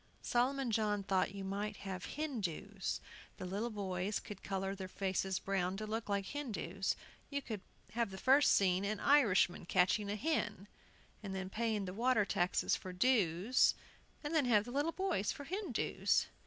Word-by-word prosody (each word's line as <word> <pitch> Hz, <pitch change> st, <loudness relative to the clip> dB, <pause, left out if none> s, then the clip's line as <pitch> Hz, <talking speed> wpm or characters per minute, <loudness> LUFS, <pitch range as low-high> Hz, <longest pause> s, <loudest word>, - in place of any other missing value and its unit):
Solomon 255 Hz, +1 st, +1 dB
John 210 Hz, -2 st, +1 dB
thought 190 Hz, 0 st, +1 dB
you 195 Hz, -, -5 dB
might 205 Hz, +2 st, -3 dB
have 190 Hz, -1 st, -5 dB
"Hindoos"; 205 Hz, -, -3 dB, 0.4 s
the -, -, -5 dB
little 200 Hz, +6 st, -2 dB
boys 195 Hz, -2 st, -2 dB
could 205 Hz, -2 st, -9 dB
color 195 Hz, 0 st, -2 dB
their 190 Hz, -1 st, -6 dB
faces 190 Hz, 0 st, -1 dB
brown, 190 Hz, -1 st, -1 dB
to 215 Hz, -, -4 dB
look 220 Hz, +1 st, -3 dB
like 200 Hz, -1 st, 0 dB
Hindoos. 200 Hz, -, -2 dB, 0.3 s
You 280 Hz, -1 st, -2 dB
could 215 Hz, -5 st, -5 dB, 0.3 s
have 230 Hz, -2 st, 0 dB
the 190 Hz, -, -8 dB
first 270 Hz, +7 st, +5 dB
scene 185 Hz, -1 st, +3 dB
an 205 Hz, +1 st, -1 dB
Irishman 205 Hz, -11 st, +4 dB
catching 190 Hz, +3 st, +3 dB
a 205 Hz, -, -1 dB
hen, 215 Hz, -, -1 dB, 0.5 s
and 195 Hz, -3 st, -5 dB
then 190 Hz, 0 st, -4 dB
paying 220 Hz, -2 st, 0 dB
the 180 Hz, -, -5 dB
water 230 Hz, 0 st, +3 dB
taxes 180 Hz, -2 st, +1 dB
for 185 Hz, -, -6 dB
"dues," 200 Hz, 0 st, +3 dB, 0.5 s
and 295 Hz, +2 st, -3 dB
then 310 Hz, -4 st, +3 dB
have 215 Hz, -4 st, +4 dB
the 245 Hz, -, -7 dB
little 290 Hz, +5 st, +1 dB
boys 370 Hz, -, 0 dB
for 285 Hz, -, -7 dB
Hindoos. 370 Hz, -, 0 dB
205 Hz, 170 wpm, -36 LUFS, 190-245 Hz, 0.5 s, first